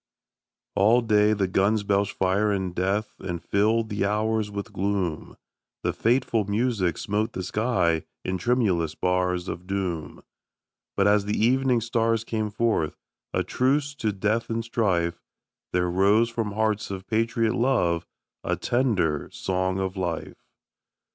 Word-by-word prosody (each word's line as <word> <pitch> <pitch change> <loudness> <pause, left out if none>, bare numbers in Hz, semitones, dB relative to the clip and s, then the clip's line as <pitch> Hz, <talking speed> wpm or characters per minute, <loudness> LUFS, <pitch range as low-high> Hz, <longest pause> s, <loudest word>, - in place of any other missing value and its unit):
ALL 110 +5 +5
day 105 -2 +3
the 100 -3 +1
guns 100 +3 +2
belched 100 0 +1
fire 95 +3 +1
and 95 -3 -2
death 100 +4 -1
And 85 -3 -4
filled 110 +2 +2
the 105 0 -1
hours 105 +1 0
with 100 +2 -6
gloom; 95 -4 -2 0.5
The - - 0
fateful 115 -1 +1
music 100 -5 0
smote 105 +2 -1
the 95 - -4
sky 90 -6 +1 0.2
In 95 0 -1
tremulous 90 -9 +1
bars 90 +1 0
of 90 +1 -6
doom; 90 -6 -3 0.7
But 100 - +3
as 105 0 +3
the 105 - -1
evening 125 +1 +3
stars 115 -1 +1
came 110 -2 -2
forth 110 -7 0 0.3
A - - 0
truce 140 +3 +1
to 110 -7 0
death 105 +4 -1
and 115 0 -2
strife, 90 -8 0 0.5
There 90 0 +1
rose 100 +6 +3
from 115 -3 -2
hearts 110 0 0
of 95 -1 -6
patriot 115 0 +1
love 90 -10 +1 0.4
A - - 0
tender 105 - 0
song 95 0 -1
of 95 0 -2
life. 90 -4 -4
105 Hz, 140 wpm, -25 LUFS, 95-115 Hz, 0.7 s, ALL